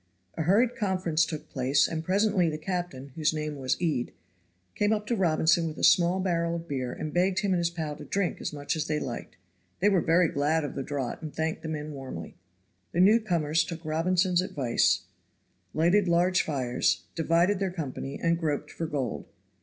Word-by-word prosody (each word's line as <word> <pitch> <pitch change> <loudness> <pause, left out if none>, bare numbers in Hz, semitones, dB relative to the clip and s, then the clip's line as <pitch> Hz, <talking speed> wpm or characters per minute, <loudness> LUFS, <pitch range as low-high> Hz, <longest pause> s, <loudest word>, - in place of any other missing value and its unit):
A - - -3
hurried 220 +9 +3
conference 185 -6 +1
took 155 -1 -6
place, 135 +1 +2
and 160 -1 -4
presently 195 -1 +2
the 155 - -3
captain, 155 -5 -4
whose 155 0 0
name 150 -1 -3
was 130 -1 -1
Ede, 155 -8 -1 0.6
came 205 +1 +1
up 210 -1 -2
to 235 - 0
Robinson 165 -3 +3
with 155 - -6
a - - -6
small 180 +1 +5
barrel 170 -2 0
of 170 0 -6
beer 130 -4 -3
and 155 +3 -5
begged 185 +2 +2
him 200 -2 +1
and 180 - +1
his 170 -1 +1
pal 160 -3 -4
to - - -9
drink 195 -2 -1
as - - -3
much 145 0 -3
as 155 -1 -2
they 150 -1 0
liked. 120 -7 -6 0.4
They 205 - +4
were 190 -4 +3
very 165 +2 +4
glad 150 +2 +1
of 145 - -4
the - - -4
draught 135 -1 -4
and 155 -2 -6
thanked 160 +1 -2
the 160 - -5
men 155 -1 -4
warmly. 130 - -7 0.6
The 170 - 0
newcomers 180 -6 +3
took 165 -1 -7
Robinson's 175 +3 +2
advice, 135 -10 +1 0.7
lighted 180 +5 +3
large 175 +2 +3
fires, 125 - 0
divided 170 +4 +2
their 195 -1 0
company, 140 -5 -5
and 170 0 +1
groped 150 -4 -2
for 165 - -4
gold. 140 -6 -3
165 Hz, 195 wpm, -28 LUFS, 150-180 Hz, 0.7 s, small